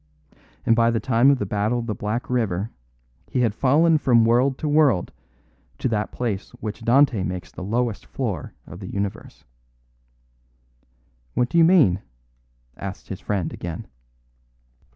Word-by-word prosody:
And 115 - +4
by 115 0 +4
the 115 -1 +1
time 125 +2 +3
of 140 - +4
the 105 - -2
Battle 105 +4 0
of 120 - -3
the 110 - -2
Black 105 +4 -3
River 110 -4 -1 0.6
he 125 - 0
had 115 -4 +2
fallen 155 +7 +3
from 120 -5 +4
world 125 +4 +3
to 155 - -3
world 145 - +3 0.7
to - - -1
that 105 -2 -1
place 110 -5 -3
which 110 +1 -5
Dante 120 -2 +4
makes 90 -1 -4
the - - -9
lowest 115 +2 -2
floor - - -4
of 90 - -11
the 95 - -8
universe." 100 -8 -5 1.9
"What 125 0 +1
do 170 - +2
you - - +7
mean?" 155 - +5 0.7
asked 100 -1 -8
his 95 - -5
friend 95 -5 -2
again. 85 +5 -6
115 Hz, 150 wpm, -23 LUFS, 100-130 Hz, 1.9 s, you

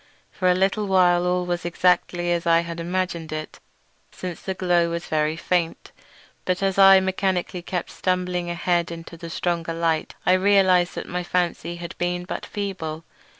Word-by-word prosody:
For 185 -2 0
a 180 - +4
little 195 +3 +1
while 180 -2 +4
all 180 0 +1
was 175 -1 -2
exactly 175 0 +1
as 170 0 -1
I 165 0 +5
had 170 0 -6
imagined 175 -2 -2
it, 155 0 -6 0.5
since 180 -2 -7
the 190 - -4
glow 175 -2 +2
was 170 +1 -4
very 155 0 0
faint; 170 0 -1 0.5
but 185 +1 -1
as 195 0 +1
I 195 0 +9
mechanically 190 -1 -1
kept 175 0 -4
on - - -14
stumbling 180 -1 -1
ahead 175 0 0
into 170 0 -8
the 165 0 -8
stronger 165 -1 -2
light 165 -1 -1
I 180 - +5
realised 185 -2 +4
that - - -5
my 180 0 -3
fancy 175 -1 -1
had 170 0 -8
been 175 0 -1
but - - -5
feeble. 175 -6 -4
175 Hz, 175 wpm, -23 LUFS, 170-185 Hz, 0.5 s, I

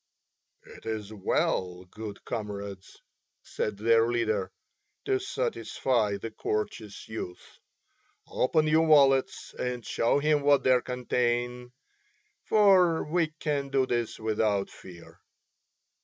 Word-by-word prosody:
"It - - -13
is 110 -1 -4
well, 95 -2 -1
good 105 -2 -8
comrades," 100 -3 -6 0.4
said 105 -2 -3
their 115 +2 +3
leader, 115 -3 -1 0.5
"to 395 -1 +1
satisfy 130 - -1
the 115 +3 -7
courteous 105 -1 -4
youth. 100 -5 -8 0.7
Open 155 +4 +1
your 160 +1 +3
wallets 135 -3 +3
and 125 -2 -3
show 115 - +1
him 150 0 +2
what 140 0 +4
they 130 -1 +4
contain, 125 0 -2 0.7
for 190 -6 +4
we 165 +1 +1
can 145 -3 -2
do 135 -1 +2
this 120 -3 -2
without 105 -2 0
fear." 85 -3 -14
120 Hz, 110 wpm, -28 LUFS, 105-140 Hz, 0.7 s, what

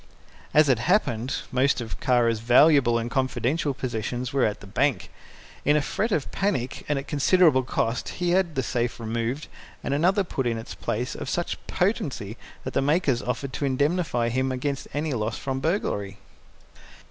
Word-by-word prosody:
As 155 0 +5
it 130 -4 +3
happened, 130 - +1 0.2
most 130 +2 +2
of 110 -8 -6
Kara's 120 -3 +2
valuable 125 +1 +5
and 115 +1 -3
confidential 135 +3 0
possessions 120 0 -3
were 135 -2 +3
at 105 - -1
the - - -12
bank. 130 +7 0 0.5
In 145 +1 +4
a - - +2
fret 220 +10 -1
of 155 -8 -1
panic 155 -11 -1
and 145 - +1
at 135 - -5
considerable 150 0 +4
cost 125 -1 -1
he 175 -1 0
had 175 -3 +2
the 130 - 0
safe 120 -1 -1
removed 115 +5 -2 0.4
and - - -1
another 185 +7 +3
put 135 -8 -2
in 115 -1 0
its 115 - -7
place 120 +4 -3
of - - -6
such 175 - -2
potency 150 - -1 0.3
that 130 - -5
the - - +2
makers 145 -3 +2
offered 130 +2 -3
to 145 - -2
indemnify 140 -3 +1
him 130 +2 0
against 135 +2 -3
any 150 0 -2
loss 110 -2 -2
from 135 -1 -3
burglary. 105 - -1
130 Hz, 170 wpm, -25 LUFS, 120-150 Hz, 0.5 s, As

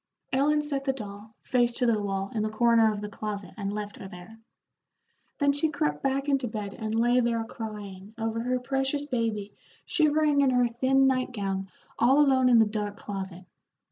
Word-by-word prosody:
Ellen 295 +3 +3
set 280 -2 -2
the 270 - +1
doll, 210 -2 -9
face 245 -1 +2
to 250 +1 0
the 225 -3 +2
wall, 195 -1 -3
in 220 - -1
the 215 - 0
corner 230 0 +4
of 205 -1 -5
the 210 - -4
closet, 205 -3 -5
and 200 -3 -3
left 205 0 -5
her 195 - -8
there. 180 +5 -12 1.0
Then 285 -1 +3
she 295 +3 +1
crept 150 - -1
back 275 +1 0
into 275 -3 +1
bed, 210 -3 -5
and 220 +1 -4
lay 240 +2 +4
there 230 -2 +1
crying 210 -3 -8
over 225 0 -2
her 250 +2 0
precious 270 +3 -1
baby 225 -6 -2 0.3
shivering 305 -3 +3
in 275 - +4
her 250 -1 +3
thin 260 +3 +2
night 255 -1 +1
gown 195 -3 -3 0.3
all 260 +5 +5
alone 265 -3 +4
in 240 - +6
the 225 - +6
dark 210 -1 -3
closet. 190 -3 -6
230 Hz, 190 wpm, -27 LUFS, 205-265 Hz, 1.0 s, in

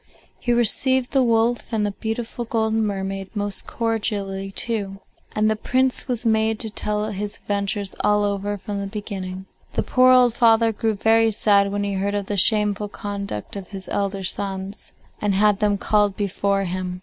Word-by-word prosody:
He 240 - -1
received 245 +2 +3
the 270 - +3
wolf 230 -1 +1
and 215 -2 0
the 205 - -1
beautiful 225 +3 -4
golden 220 -1 0
mermaid 195 -1 -3
most 205 -1 -2
cordially 205 -4 -2
too, 200 -3 -1 0.4
and 215 0 +2
the 215 - +2
Prince 255 +5 0
was 245 -2 -2
made 220 0 +2
to 220 - -4
tell 210 +1 -2
his 205 +1 -4
adventures 200 -1 -2
all 210 0 +2
over 205 0 -1
from 200 +1 -5
the 200 - -3
beginning. 190 -2 -6 0.3
The - - 0
poor 255 0 +4
old 250 -2 +5
father 230 -2 +4
grew 220 +1 -1
very 225 +2 +3
sad 200 -2 +3
when 205 0 -1
he 200 0 -2
heard 200 +1 -1
of 200 -1 -2
the 205 - -2
shameful 210 +1 +3
conduct 200 - -6
of 195 -2 -7
his 195 -2 -8
elder 200 -1 -1
sons, 195 +1 -4 0.3
and 205 -2 +1
had 205 0 +3
them 205 -1 +2
called 205 -1 +2
before 200 0 0
him. 180 0 -4
205 Hz, 175 wpm, -22 LUFS, 200-225 Hz, 0.4 s, old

